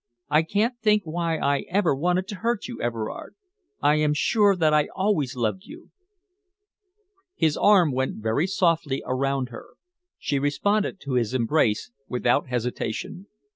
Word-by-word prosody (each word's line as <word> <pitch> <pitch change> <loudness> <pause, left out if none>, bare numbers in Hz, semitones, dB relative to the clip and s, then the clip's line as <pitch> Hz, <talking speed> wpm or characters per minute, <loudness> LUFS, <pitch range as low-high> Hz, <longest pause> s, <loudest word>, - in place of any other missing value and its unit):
I 150 +1 +5
can't 215 +9 -1
think 210 -2 +3
why 165 0 -1
I 140 -1 0
ever 185 -4 +2
wanted 180 +6 0
to 205 - -5
hurt 230 -2 -1
you, 240 - -7
Everard. 115 -2 -4 0.5
I 150 +1 +4
am 150 -1 +1
sure 205 +5 +3
that 160 -4 +2
I 150 -1 +3
always 185 -9 0
loved 125 - -2
you." 335 +4 -13 1.4
His 160 -2 +1
arm 190 -7 +4
went 130 +1 -1
very 110 - 0
softly 165 -7 0
around 135 0 -1
her. 120 - -12 0.4
She 140 - -1
responded 200 +9 0
to 140 - -5
his 125 0 0
embrace 120 - +1 0.2
without 125 -1 +1
hesitation. 125 - -4
155 Hz, 145 wpm, -25 LUFS, 130-195 Hz, 1.4 s, I